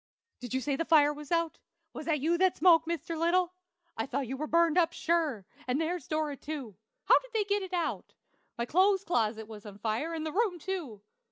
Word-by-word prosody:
"Did 250 0 -5
you 260 - 0
say 280 +1 -1
the 330 - -1
fire 300 -3 +5
was 295 0 -10
out? 335 -1 0 0.3
Was - - -7
that 300 -4 +1
you 330 +4 +2
that 375 -1 +3
spoke, 330 -1 +5
Mr. 335 0 -3
Little? 345 +2 +2 0.4
I 225 - -3
thought 270 +1 -2
you 265 - -3
were 305 +3 -4
burned 335 0 +3
up, 340 -2 +3
sure; 315 - 0 0.2
and 255 +3 +1
there's 325 -2 -2
Dora, 310 -2 -1
too. 275 -9 -6 0.3
How - - +6
did - - -17
they 440 -2 +2
get 405 0 0
it 380 -1 -6
out? 350 -2 -3 0.4
My 235 - -1
clothes 380 +7 +3
closet 220 - 0
was 215 -2 -10
on 205 -2 -10
fire, 225 +10 -2
and 315 -1 -4
the 315 - -2
room, 400 -1 +1
too! 315 - -5
315 Hz, 215 wpm, -30 LUFS, 265-345 Hz, 0.4 s, How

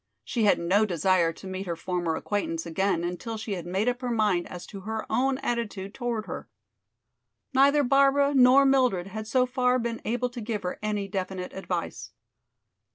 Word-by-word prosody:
She 230 -3 0
had 205 - +5
no 185 +5 +2
desire 180 -2 +2
to 190 - -13
meet 190 0 -5
her 170 - -2
former 175 -1 -2
acquaintance 170 -5 -2
again 175 +1 0
until 180 +6 -4
she 215 -1 -4
had 175 -2 -5
made 190 +5 0
up 245 +1 0
her 250 - -2
mind 210 -6 +1
as 180 -1 -8
to 200 - -9
her 220 +3 -4
own 260 +4 +2
attitude 230 -7 -3
toward 235 -4 -3
her. - - -7 1.0
Neither 280 +2 +5
Barbara 275 +2 +4
nor 265 +1 +6
Mildred 255 -10 +3
had 215 +3 -6
so 250 +2 +3
far 250 0 +1
been 235 -2 -3
able 245 +2 -1
to 240 -1 -7
give 215 -2 -3
her 180 - -4
any 210 -2 -2
definite 185 -2 -4
advice. 190 - -4
215 Hz, 180 wpm, -27 LUFS, 185-250 Hz, 1.0 s, nor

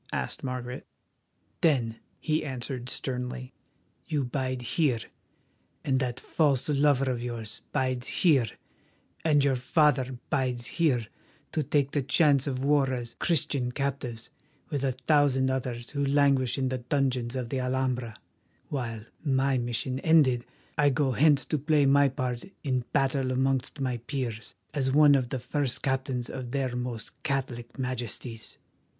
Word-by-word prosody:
asked - - -3
Margaret. 125 -1 -5 0.7
"Then," 120 -8 +2 0.2
he 155 0 0
answered 130 -2 -4
sternly, 125 0 -3 0.5
"you 150 -3 0
bide 130 0 -2
here, 130 +1 +1 0.9
and 130 -1 +2
that 125 -2 -2
false 140 -5 +1
lover 140 -2 +3
of 120 -2 -3
yours 115 -3 -5
bides 130 -1 0
here, 140 -10 +3 0.8
and 150 -3 +4
your 140 -2 +3
father 130 -1 +2
bides 125 -4 0
here 135 -9 +1 0.5
to 155 - 0
take 140 -1 +1
the 145 - +1
chance 140 0 +3
of 130 -1 -2
war 140 -2 +3
as 120 -2 -4
Christian 140 -6 +1
captives 125 -4 -3 0.4
with 140 -2 -1
a 135 -2 +1
thousand 130 0 +3
others 125 -2 -3
who 140 -1 -1
languish 140 -3 +3
in 130 -1 0
the 130 0 -2
dungeons 125 -1 0
of 125 -3 -3
the 135 - -1
Alhambra, 125 -3 -1 0.5
while, 115 -6 -4 0.2
my 135 -2 +2
mission 120 +2 -2
ended, 135 -7 +4 0.3
I 145 -1 +6
go 135 0 +1
hence 145 +1 +4
to 155 - -1
play 150 0 +3
my 140 +1 +5
part 125 -2 -3 0.2
in 130 -4 0
battle 135 -2 +1
amongst 130 +2 0
my 130 -2 -1
peers, 120 -2 -4 0.2
as 135 -3 0
one 145 +1 +7
of 130 -3 +2
the 130 - -2
first 130 +1 -2
captains 130 -2 -1
of 130 -2 -6
their 130 -1 -1
Most 125 -2 -5
Catholic 130 -4 -3
Majesties. 120 -3 -5
130 Hz, 145 wpm, -28 LUFS, 125-140 Hz, 0.9 s, one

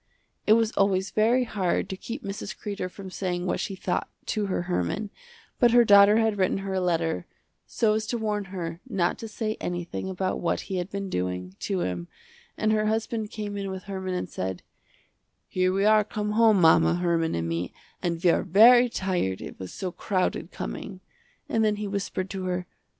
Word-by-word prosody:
It 215 - +7
was 225 -1 +3
always 195 -2 +1
very 235 +4 +3
hard 195 -7 -1
to 190 - -3
keep 235 +7 -7
Mrs. 200 +1 -5
Kreder 200 -3 -4
from 190 0 -10
saying 180 -2 -2
what 180 - -1
she 195 - -3
thought, - - -2 0.2
to 210 -2 -1
her 185 -2 -1
Herman, 180 - -2 0.5
but 240 - +6
her 240 -1 +7
daughter 200 0 +7
had 220 -2 +1
written 185 0 +2
her 195 - -3
a 190 - 0
letter, 165 - 0 0.4
so 220 -2 +2
as 215 0 -1
to 240 - -1
warn 210 -2 -1
her 175 -3 -5
not 185 -6 0
to 225 - -6
say 215 0 -3
anything 175 +1 -4
about 185 0 -2
what 170 - 0
he 190 - -4
had 180 +1 -3
been 200 0 -4
doing, 90 - -3
to 195 -3 -1
him, 90 -1 -3 0.5
and 215 - +1
her 215 0 +2
husband 220 0 -1
came 210 -1 -5
in 200 -1 -3
with 190 -1 -6
Herman 190 -2 -4
and 180 - -2
said, 95 -1 -4 0.8
"Here 185 0 +1
we 195 +2 +1
are 215 0 +6
come 210 0 -3
home 220 -2 +5
mama, 165 0 +5
Herman 170 -2 +1
and 85 0 -2
me, 85 +1 -2 0.3
and 170 -2 -1
we 175 - +6
are - - +2
very 240 +7 +7
tired 180 - -1
it - - -9
was 95 -1 -7
so 185 -2 -4
crowded 185 0 -1
coming," 185 - -6 0.5
and 225 - +1
then 210 -1 +2
he 210 0 -4
whispered 195 -2 -3
to 190 -1 -4
her. 180 0 -2
195 Hz, 200 wpm, -26 LUFS, 180-215 Hz, 0.8 s, It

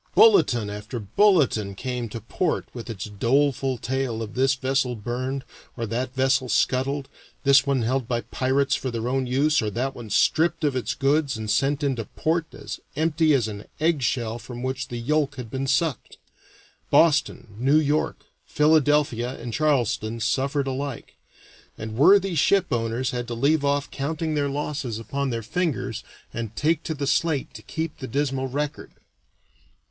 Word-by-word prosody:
Bulletin 130 - +5
after 105 +4 -6
bulletin 110 - +2
came 125 +1 -4
to 115 - -6
port 160 - -1
with 120 -1 -8
its 100 -4 -5
doleful 130 +5 +1
tale 125 -3 -2
of 110 0 -8
this 135 +2 +2
vessel 130 -1 0
burned 130 +4 -4 0.3
or 115 - -2
that 125 +4 -3
vessel 130 -1 +2
scuttled, 135 +3 +1 0.4
this 140 0 +5
one 135 -3 +1
held 125 +1 0
by 120 -1 -1
the - - -25
pirates 135 +1 +1
for 130 - -1
their 115 -1 -3
own 130 0 0
use 145 +4 +2
or 110 - -1
that 125 +6 -2
one 120 -4 -9
stripped 160 - +2
of 145 -3 +1
its 130 - -2
goods 140 -1 +1
and 110 -1 -3
sent 140 +6 +1
into 130 -5 0
port 165 +5 -1
as 140 - -7 0.2
empty 155 0 +3
as 120 -5 +1
an 105 -1 -7
eggshell 125 -7 0
from 120 +1 -8
which 130 0 -3
the 120 - -5
yolk 145 +4 0
had 125 -4 -8
been 135 +1 -2
sucked. 140 -2 0 0.7
Boston, 145 -9 +2
New 135 +5 +4
York, 150 0 0 0.2
Philadelphia, 145 -5 +2
and 120 -1 -6
Charleston 120 -6 0
suffered 135 +5 0
alike, 135 -1 -4 0.6
and 110 0 -6
worthy 190 - +5
ship 170 +1 +2
owners 120 +2 -1
had 120 -1 -3
to 120 - -4
leave 145 +5 +2
off 140 0 0
counting 155 +3 -2
their 145 -1 0
losses 140 -5 -3
upon 140 +4 -3
their 115 -2 -3
fingers 140 - -2 0.3
and 115 -2 -5
take 160 +1 +1
to 160 - -2
the 140 -1 -3
slate 145 +1 0
to - - -10
keep 160 -1 -5
the 130 - -5
dismal 135 0 -1
record. 145 +3 -4
135 Hz, 165 wpm, -24 LUFS, 120-145 Hz, 0.7 s, Bulletin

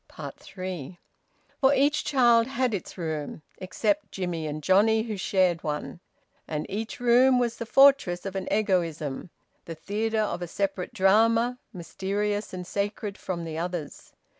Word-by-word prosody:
THREE. 185 -4 -7 0.6
For 275 0 +4
each 290 +3 +2
child 240 -4 +4
had 260 -3 0
its 195 - -5
room 155 -3 -4 0.2
except 200 +2 -1
Jimmie 175 -4 -3
and 150 0 -5
Johnnie, 220 +5 +4
who 220 -2 -4
shared 185 -3 +1
one. 150 +3 -4 0.5
And 150 -1 -3
each 220 +5 -4
room 250 +2 +5
was 240 -2 0
the 230 - -6
fortress 270 -11 +4
of 195 -1 -5
an 190 -1 -4
egoism, 170 -7 -1 0.4
the 165 - -7
theatre 215 +7 -2
of 210 -4 -1
a 175 - -3
separate 195 +1 -3
drama, 230 +5 +3
mysterious, 205 +3 -3
and 180 -1 -6
sacred 200 +1 -3
from 180 -4 -5
the 160 -1 -5
others. 170 -4 -5
195 Hz, 145 wpm, -26 LUFS, 175-225 Hz, 0.6 s, room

